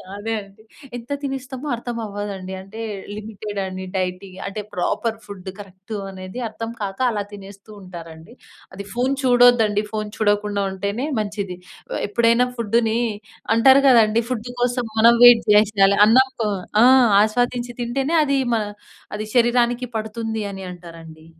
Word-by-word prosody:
అదేండి. 205 -1 -6 0.3
ఎంత 240 +3 -11
తినేస్తామో 270 0 -5
అర్థం 235 0 -6
అవ్వదండి. 200 -2 -6
అంటే 210 +4 -10 0.3
లిమిటెడని 205 -3 -6
డైటింగ్, 185 0 -4
అంటే 205 +2 -5
ప్రాపర్ 220 +5 -1
ఫుడ్ 195 -2 -9
కరెక్టనేది 195 0 -8
అర్థం 225 +1 -6
కాక 195 +1 -4
అలా 205 -2 -2
తినేస్తుంటారండి. 195 -3 -12 0.4
అది 200 +1 -7
ఫోన్ 250 +3 0
చూడొద్దండి, 245 -4 +4
ఫోన్ 215 -1 -3
చూడకుండుంటేనే 205 +1 -1
మంచిది. 200 -3 -4 0.4
వ - - -2
ఎప్పుడైనా 235 +3 +3
ఫుడ్‌ని, 230 0 +1 0.6
అంటారు 265 +4 +6
గదండీ 230 -2 +5
ఫుడ్ 240 -2 -3
కోసం 245 0 0
మనం 235 +1 +7
వెయిట్ 245 -2 +8
చేసేయాలి 205 -2 +4
అన్నం 260 +4 +5
కో 215 - 0 0.3
ఆ! - - +7 0.4
ఆస్వాదించి 245 +3 0
తింటేనే 270 +6 -1
అది 280 -2 +1 0.2
మన 220 - 0 0.5
అది 215 +1 -4
శరీరానికి 240 0 +2
పడుతుందనంటారండి. 190 -8 -7
215 Hz, 120 wpm, -21 LUFS, 195-235 Hz, 0.6 s, వెయిట్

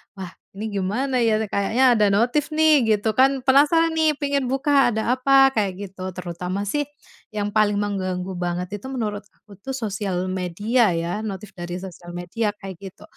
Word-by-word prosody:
"Wah 185 -3 -7 0.3
ini 215 - -4
gimana 235 +8 -1
ya? 220 -2 +3
Kayaknya 220 +6 +1
ada 210 - +4
notif 250 +8 +1
nih," 310 -5 +4
gitu 215 +2 -2
kan 270 0 +4
penasaran 295 +5 +4
nih 315 -1 +3
pingin 280 -2 0
buka 270 -1 +2
ada 230 +4 0
apa 270 +1 +5
kayak 205 -7 -1 0.2
gitu. 185 -1 -7
Terutama 180 +2 -4
sih 290 +3 0 0.5
yang 205 -1 -2
paling 205 -1 +2
mengganggu 185 -2 -3
banget 180 +3 -3
itu 205 - -15
menurut 210 -5 -3
aku 205 -2 -18
tuh 265 +7 -6
sosial 200 -6 -3
media 190 +4 +1
ya, 170 +6 -3
notif 200 -1 -7
dari 175 +1 -5
sosial 175 -2 -10
media 205 +5 -2
kayak 190 -3 -7
gitu, 190 -2 -11
210 Hz, 170 wpm, -22 LUFS, 185-260 Hz, 0.5 s, apa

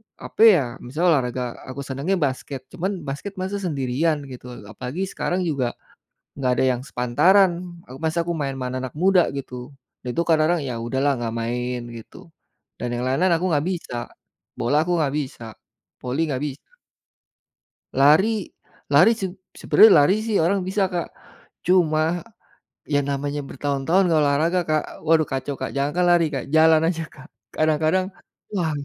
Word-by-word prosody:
apa - - -7
ya, 175 - +3 0.2
misalnya 155 +9 +1
olahraga 125 -1 -2 0.3
aku 130 +2 -6
senangnya 140 +8 -2
basket, 135 0 -4
cuman 185 +2 -2 0.2
basket 145 +9 -5
masa 190 +2 -2
sendirian 150 +1 0
gitu, 125 - -10 0.3
apalagi 130 - -6
sekarang 180 -1 -2
juga, 130 -5 -1 0.6
enggak 130 -2 0
ada - - +3
yang 120 - -7
sepantaran. 170 +11 +3 0.4
Ak 130 - -10
masa 160 +1 +1
aku 170 +1 -3
main 140 -2 -2
sama 130 -1 -4
anak-anak 130 0 -5
muda, 190 -1 +5
gitu. 135 -2 -6 0.5
Itu 125 +7 -1
kadang-kadang, 160 +1 +3
ya 125 - -3
udahlah 135 +4 +1
enggak 115 -1 -3
main, 125 +2 -2 0.2
gitu. 115 +8 -13 0.5
Dan 125 - -3
yang 120 0 -2
lain-lain 165 +8 +2
aku 170 +3 -1
enggak 150 -1 +1
bisa. 170 -8 -5 0.6
Bola 145 +6 +2
aku 175 0 0
enggak 145 -3 0
bisa. 130 -5 -5 0.6
Voli 130 +5 -2
enggak 140 -2 -2
bisa. 145 - -7 1.2
Lari 185 +10 +4 0.4
lari 175 +10 +6
seb 190 -2 -4 0.2
sebenernya 195 -9 +6
lari 185 +7 +3
sih 220 -2 0
orang 185 +4 +1
bisa, 195 0 +1
Kak. 175 -3 -4 0.6
Cuma, 170 -1 +2 0.6
ya 145 -1 +1
namanya 140 +1 -3
bertahun-tahun 145 +7 +1
enggak 160 -2 +3
olahraga, 155 +5 +2
Kak, 155 -1 +2 0.2
waduh 160 0 +4
kacau, 135 +1 -3
Kak. - - -5
Jangankan 145 +6 0
lari, 170 -1 +4
Kak, 135 -3 -3
jalan 160 0 +6
aja, 165 -2 -1
Kak, 140 +1 -15 0.3
kadang-kadang 155 +4 +2 0.5
wah, 175 -5 0
150 Hz, 155 wpm, -23 LUFS, 135-175 Hz, 1.2 s, lari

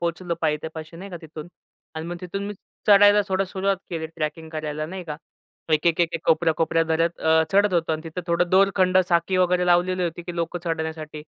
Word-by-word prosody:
पोहचलो 170 0 -2
पायथ्यापाशी 160 +1 -3
नाही 195 +3 -9
का 175 - -6
तिथून 155 +1 -9 0.5
अन् 160 +1 -5
मग 175 - -4
तिथून 195 +3 -5
मी 205 - -5 0.3
चढायला 205 0 +7
थोडं 190 +1 +1
सुरुवात 195 0 0
केली 160 -2 -3
ट्रॅकिंग 160 0 -5
करायला 155 -1 -4
नाही 185 +1 -7
का. 150 -2 -5 0.6
एक-एक, 165 +2 +2
एक-एक 165 -1 -1
कोपऱ्या 160 0 +3
कोपऱ्या 165 0 +2
धरत 165 +1 0
अ, 160 0 +4
चढत 200 -1 +3
होतो 165 -1 +1
अन् 155 +1 -5
तिथं 165 +2 -6
थोडं 170 +1 +1
दोरखंड, 190 -1 +4
साखळी 170 +2 +1
वगैरे 180 0 +2
लावलेली 180 +1 +2
होती, 170 0 -3
की 175 0 -7
लोकं 170 +1 -2
चढण्यासाठी, 160 -2 -4
170 Hz, 190 wpm, -24 LUFS, 160-185 Hz, 0.6 s, चढायला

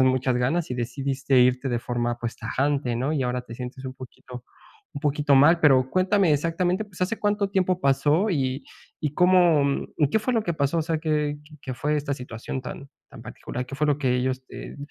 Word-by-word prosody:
tenías - - +6
muchas 130 -1 +2
ganas 135 +6 0
y - - -1
decidiste 135 +2 0
irte 125 +2 +2
de 120 -2 0
forma, 120 0 -2
pues 120 -1 -4
tajante, 135 +2 -1
¿no? 130 +5 -1
Y 145 -4 0
ahora 125 0 -1
te 115 - -10
sientes 125 +2 -7
un 130 - -6
poquito 125 -1 -11 0.5
un - - -5
poquito 145 -1 +2
mal. 150 +6 +6
Pero 130 -4 +5
cuéntame 185 -1 +3
exactamente, 175 +6 0
pues, 185 -4 -16
¿hace 190 +5 -1
cuánto 205 -1 0
tiempo 185 -2 +1
pasó 150 +8 +2
y 135 -4 -1 0.4
y 150 -1 -2
cómo 175 -6 +3
y 145 -3 +2
qué 220 - +3
fue 245 +3 -1
lo 225 - +2
que 170 - -1
pasó, 140 +2 0
o - - +1
sea, 160 0 -1
qué 150 -2 -1 0.2
qué 130 - -5
fue 150 +4 -1
esta 145 -1 -2
situación 125 0 -6
tan 140 +2 -8 0.2
tan - - -12
particular, 125 +1 -6
qué 135 - -8
fue 150 +2 0
lo 145 -1 +2
que 130 -4 +1
ellos 130 +1 -2
te - - -9
140 Hz, 215 wpm, -25 LUFS, 130-165 Hz, 0.5 s, tenías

